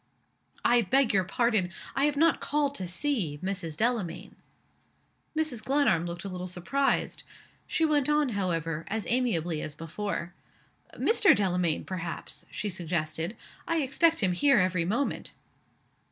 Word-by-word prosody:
"I 240 0 +5
beg 255 +4 +2
your 190 -1 +3
pardon 220 -3 +1 0.3
I 275 - +3
have 295 -1 0
not 325 +2 +4
called 290 -1 0
to 185 -9 -4
see 180 - -1
Mrs. 185 -5 -3
Delamayn." 205 -6 -1 1.0
Mrs. 290 -8 0
Glenarm 265 - +2
looked 170 0 -6
a - - -2
little 180 -1 -5
surprised. 245 +11 0 0.5
She 325 - +1
went 295 -3 +2
on, 300 -2 +3
however, 165 -6 -2
as 215 +2 -3
amiably 175 -11 0
as 150 - -5
before. 170 +2 -4 0.6
"Mr. 435 -3 +5
Delamayn, 180 -5 +1
perhaps?" 175 -3 -6
she 210 - -4
suggested. 170 0 -3 0.3
"I 330 -3 +1
expect 320 +4 +3
him 185 -3 +3
here 275 +10 +4
every 185 -3 +2
moment." 235 +10 -1
200 Hz, 140 wpm, -28 LUFS, 175-275 Hz, 1.0 s, I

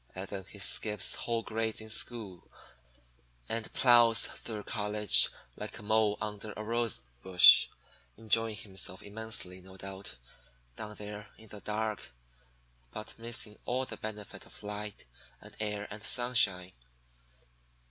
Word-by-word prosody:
Then 95 0 -7
he - - -12
skips 105 0 +3
whole 115 -1 -2
grades 110 0 -3
in 110 0 -5
school 110 -6 +1 1.0
and 115 -1 -4
plows 120 -2 +5
through 110 -3 -7
college 105 -12 +4 0.3
like - - -7
a - - -11
mole 110 0 +1
under 105 0 -6
a 110 - -7
rose 115 - -1 0.2
bush, 90 +2 +7 0.5
enjoying 115 0 +1
himself 95 -3 -3
immensely, 105 -3 -2
no 95 +1 -14
doubt, 95 -5 -7 0.6
down 105 -1 -7
there 105 0 -9
in 110 - -16
the 105 0 -10
dark, 110 0 -4 0.8
but 110 - -9
missing 115 -2 +2
all 130 +2 -1
the - - -8
benefit 105 -1 -8
of - - -12
the - - -13
light 105 0 -7 0.3
and - - -14
air 105 -1 -4
and 105 +1 -8
sunshine. 100 -7 +3
105 Hz, 135 wpm, -30 LUFS, 100-110 Hz, 1.0 s, bush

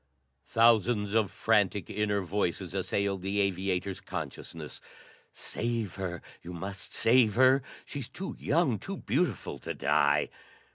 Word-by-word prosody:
Thousands 115 -2 +3
of 110 -3 +3
frantic 100 -5 +2
inner 105 0 0
voices 90 -1 -2
assailed 100 -2 -1
the 100 +2 -1
aviator's 95 0 0
consciousness. - - -7 0.5
"Save 115 -4 -3
her! 90 -3 -4 0.2
You 90 - -8
must 95 +2 -6
save 115 -3 +4
her! 130 +2 +6 0.2
She's 140 -5 -6
too 190 +2 -6
young, 145 -7 +2
too 195 -1 -5
beautiful 145 - -1
to - - -5
die!" - - +3
105 Hz, 125 wpm, -30 LUFS, 95-120 Hz, 0.5 s, her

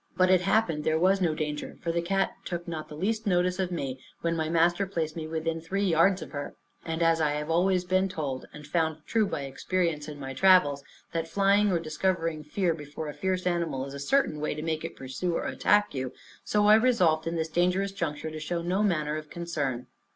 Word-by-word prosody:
But 185 0 +4
it 185 -1 +5
happened 180 -5 +1
there 160 0 +2
was 190 +3 +3
no 165 -4 +2
danger, 150 -1 -4
for 170 - -2
the 170 0 0
cat 195 +3 +1
took 175 -1 -5
not 160 -2 -5
the 150 - -8
least 215 +5 -1
notice 180 0 +2
of 185 -2 0
me, 135 -6 -3 0.2
when 170 0 0
my 160 -1 -1
master 175 +4 +2
placed 160 -4 -2
me 160 -2 -4
within 165 0 -2
three 195 +5 -2
yards 185 +1 +3
of - - -11
her. 145 -1 -5 0.3
And 165 +1 -2
as 165 -1 +3
I 150 -1 +2
have 150 0 -2
been - - +2
always 180 +1 +2 0.2
told, 140 -7 -4
and 150 0 -11
found 160 0 -1
true 220 -2 +2
by 145 - -3
experience 155 +2 -1
in 150 -1 -8
my 135 -1 -5
travels, 145 -4 +4 0.3
that 165 -1 -1
flying 200 +3 +3
or 175 - +2
discovering 165 0 -1
fear 170 +3 0
before 150 0 -7
a - - -5
fierce 185 +1 -2
animal 170 -7 0
is 140 - -8
a 140 - -6
certain 155 - +1
way 150 0 -2
to 155 - -5
make 160 -1 -2
it 165 - -5
pursue 135 +7 -3
or - - -2
attack 205 0 +2
you, 130 -2 -3 0.3
so 210 0 +2
I 210 - +8
resolved, 185 -10 +3
in 165 - -1
this 160 -1 -1
dangerous 180 +4 +1
juncture, 160 -5 -3
to 155 - -6
show 170 +2 -3
no 185 +4 0
manner 155 -7 +1
of 155 -1 -8
concern. 145 -8 -3
165 Hz, 225 wpm, -28 LUFS, 155-185 Hz, 0.3 s, I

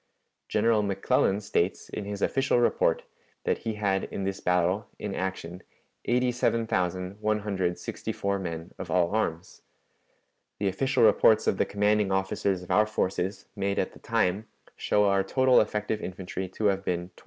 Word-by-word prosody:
General 115 -2 +3
McClellan 100 0 +1
states, 95 -2 -1
in 105 - -5
his 100 0 -4
official 135 -1 +2
report, 120 - +2 0.4
that - - 0
he 110 -1 -3
had 100 -2 0
in 100 - -5
this 95 0 -2
battle, 90 +4 +1
in 105 -2 -4
action, 95 -2 -4 0.4
87,164 100 -5 -1
men 85 -2 -6
of 90 - -6
all 85 0 +2
arms. 90 -6 -2 1.0
The 100 - -1
official 130 +8 +1
reports - - +5
of - - +1
the - - +3
commanding 105 0 +1
officers 95 -1 0
of 90 - -8
our 110 0 +4
forces, 95 -2 -2
made 100 -1 -1
at - - 0
the - - -15
time, 100 +5 0 0.3
show 105 0 +2
our 100 -1 +3
total 130 +5 +4
effective 105 0 -2
infantry 95 0 -5
to 105 +3 -4
have 100 -1 +2
been 90 -1 -2
27,255. - - -17
100 Hz, 150 wpm, -27 LUFS, 95-105 Hz, 1.0 s, reports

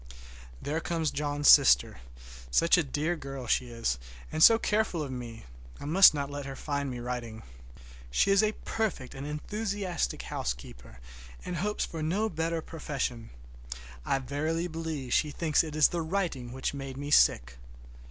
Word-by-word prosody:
There 155 +3 -2
comes 165 -3 -1
John's 145 0 -1
sister. 60 0 +6 0.5
Such 165 - +4
a 175 - +3
dear 150 +5 -1
girl 135 -4 -7
as 120 - -2
she 125 - +1
is, 115 - -2 0.3
and 155 - -2
so 225 +7 +9
careful 210 -7 0
of 140 - -6
me! 120 -3 -7 0.3
I - - -8
must 185 +6 +8
not 140 -1 -3
let 145 -1 -5
her 135 - -6
find 140 0 -3
me 125 -1 -5
writing. 120 -2 -5 0.7
She 60 - +2
is 195 +1 +5
a 215 0 +1
perfect, 215 -13 -2
and 135 +1 -7
enthusiastic 195 +3 -3
housekeeper, - - -6 0.5
and 180 -1 -4
hopes 210 +5 -1
for 165 - -7
no 195 +8 0
better 165 -1 -2
profession. 130 -7 -4 0.7
I 135 - +1
verily 155 +6 -2
believe 160 -6 -4
she 150 - +2
thinks 155 +1 +1
it 155 -2 -6
is 155 -2 +5
the 170 - -2
writing 160 -8 -2
which 130 +2 -3
made 135 -2 -6
me 145 +1 -5
sick! - - +3
145 Hz, 165 wpm, -29 LUFS, 130-170 Hz, 0.7 s, so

